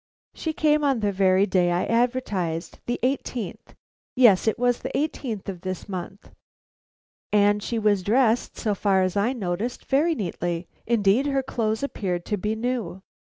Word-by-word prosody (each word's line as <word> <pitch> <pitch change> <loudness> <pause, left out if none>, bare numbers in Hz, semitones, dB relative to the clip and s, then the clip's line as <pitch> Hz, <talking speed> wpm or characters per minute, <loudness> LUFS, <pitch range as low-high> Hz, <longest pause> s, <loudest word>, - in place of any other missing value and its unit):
"She 320 - -3
came 305 -1 +2
on 270 -5 +2
the 205 -1 +1
very 190 0 +3
day 180 -3 +2
I 175 +1 +1
advertised; 220 -9 -1
the 240 - -1
eighteenth 250 -5 -3 0.4
yes, 230 -6 +5
it 220 - +2
was 245 0 +1
the 260 - -4
eighteenth 255 -8 -3
of 185 -3 -5
this 185 0 -5
month; 190 +1 -7 1.0
and 205 0 +3
she 230 +2 -3
was 210 -3 +2
dressed, 230 +4 +2
so 215 - 0
far 195 -1 +2
as 185 0 -1
I 205 +5 +2
noticed, 220 0 -3
very 315 +5 +2
neatly. 175 - -3 0.2
Indeed, 230 +3 +3
her 275 -1 0
clothes 220 -2 -2
appeared 180 -10 -3
to 210 - -1
be 210 +3 -2
new. 220 -6 -3
215 Hz, 160 wpm, -24 LUFS, 190-250 Hz, 1.0 s, yes